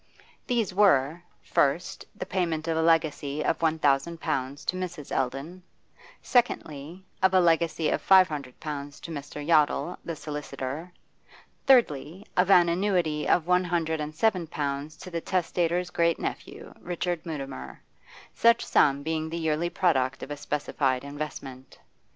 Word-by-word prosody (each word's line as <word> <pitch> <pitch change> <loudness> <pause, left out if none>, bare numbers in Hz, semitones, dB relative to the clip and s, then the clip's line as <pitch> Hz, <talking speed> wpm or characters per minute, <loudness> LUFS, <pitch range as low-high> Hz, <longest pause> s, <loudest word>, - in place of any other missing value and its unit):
These 230 -6 0
were 175 -5 +3 0.2
first, 150 +6 0
the - - -5
payment 170 -4 -1
of 165 - 0
a 160 - +1
legacy 155 -3 +1
of 165 - 0
one 160 -1 +2
thousand 155 +3 +1
pounds 140 -3 -3
to - - -1
Mrs. 180 -5 -6
Eldon; 135 +8 -3 0.6
secondly, 175 - -1 0.2
of 190 0 +4
a - - +7
legacy 165 -2 +2
of - - 0
five 190 -1 +6
hundred 140 -5 -7
pounds 145 -2 -6
to 170 - -8
Mr. 145 -1 -6
Yottle, 165 +2 +3
the 165 - -4
solicitor; 150 +2 -6 0.8
thirdly, 190 - +3
of 180 +1 +3
an 175 -3 +7
annuity 170 -4 0
of 165 - +3
one 180 +1 +3
hundred 165 -2 -1
and 150 +1 -5
seven 185 -3 +1
pounds 145 0 -4
to 185 - -10
the 170 -1 -3
testator's 175 0 0
great 170 -1 +2
nephew, - - -6
Richard 175 -1 -3
Mutimer, 135 - -7 0.5
such 235 0 +4
sum 140 0 +3
being 160 0 -2
the 165 - -4
yearly 160 +1 0
product 140 -8 +1
of 145 - -7
a - - -2
specified 140 -3 -1
investment. 140 -3 -7
160 Hz, 150 wpm, -27 LUFS, 145-175 Hz, 0.8 s, a